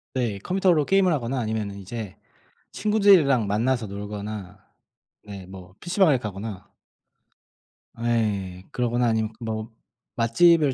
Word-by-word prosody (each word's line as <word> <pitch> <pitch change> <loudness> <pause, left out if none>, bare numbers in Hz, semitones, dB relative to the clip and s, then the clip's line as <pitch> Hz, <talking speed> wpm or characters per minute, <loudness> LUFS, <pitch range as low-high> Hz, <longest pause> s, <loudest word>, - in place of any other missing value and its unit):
네. 115 -6 -1
컴퓨터로 180 - +2
게임을 190 -1 +3
하거나 130 -2 -2
아니면은 110 -3 -3
이제 100 0 -7 0.6
친구들이랑 190 - +4
만나서 115 +3 0
놀거나 100 -1 -6 0.7
네 100 -3 -9
뭐 95 0 -12
피시방을 175 -5 +3
가거나 105 -2 -7 1.3
예. 100 -6 -1
그러거나 120 0 0
아니면 110 -1 0
뭐 110 -1 -4 0.4
맛집을 145 +5 +4
115 Hz, 275 characters per minute, -24 LUFS, 100-135 Hz, 1.3 s, 친구들이랑